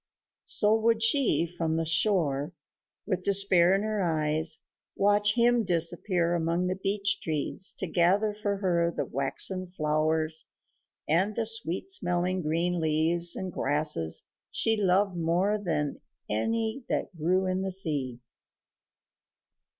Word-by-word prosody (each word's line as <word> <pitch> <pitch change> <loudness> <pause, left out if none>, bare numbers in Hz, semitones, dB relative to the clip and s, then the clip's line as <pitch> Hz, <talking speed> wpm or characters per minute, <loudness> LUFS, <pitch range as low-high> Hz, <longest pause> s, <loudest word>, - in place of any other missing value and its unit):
So 210 +1 +4
would 225 0 +1
she, 225 - +4
from 165 -2 -3
the 165 0 -1
shore, 160 -3 +1 0.5
with 185 -3 -2
despair 190 -2 +4
in 200 - -1
her 215 -1 -2
eyes, 155 -1 0 0.3
watch 205 +1 +2
him 240 0 +3
disappear 175 0 +1
among 170 +1 -1
the 185 0 -1
beech 200 +1 -2
trees 160 +4 -2
to - - -4
gather 190 +5 +1
for 205 -1 -3
her 175 -3 0
the - - -1
waxen 185 +7 -1
flowers 155 -1 0 0.6
and 190 +7 +1
the 230 - -1
sweet 225 - 0
smelling 185 - 0
green 170 +3 -1
leaves 165 +2 +1
and 185 -2 -6
grasses 145 - 0 0.2
she 225 - +2
loved 195 -1 +1
more 175 +5 0
than 150 -5 -3 0.3
any 225 - -2
that - - -3
grew 180 +4 0
in 185 0 -2
the 190 - -3
sea. 145 -10 0
180 Hz, 130 wpm, -27 LUFS, 160-200 Hz, 0.6 s, So